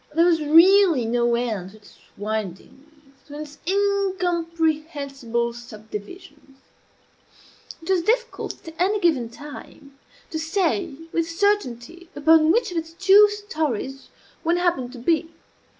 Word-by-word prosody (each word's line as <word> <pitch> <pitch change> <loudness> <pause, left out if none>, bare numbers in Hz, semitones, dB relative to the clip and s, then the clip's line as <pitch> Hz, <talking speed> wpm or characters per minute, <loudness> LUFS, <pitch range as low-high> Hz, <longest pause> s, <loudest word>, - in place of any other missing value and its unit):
There 335 +1 +5
was 335 -3 +3
really 335 - +5
no 235 +1 +1
end 220 -6 -3
to 215 - -16
its 210 - -20 0.2
windings 215 - -5 0.4
to 290 0 -9
its 295 -1 -9
incomprehensible 330 - -1
subdivisions. 240 - -11 1.3
It - - -12
was 375 -2 +2
difficult, 470 -1 -2
at 325 - -8
any 400 +4 +2
given 290 -11 +1
time, 280 +1 -12 0.3
to 315 - -3
say 340 0 -1 0.2
with 330 0 0
certainty 340 - -1
upon 315 +1 +5
which 460 0 +1
of 350 - -4
its 325 0 -9
two 390 +3 +6
stories 305 - -4 0.3
one 340 +1 +1
happened 345 -9 0
to - - -9
be. 325 +6 0
320 Hz, 125 wpm, -23 LUFS, 245-355 Hz, 1.3 s, two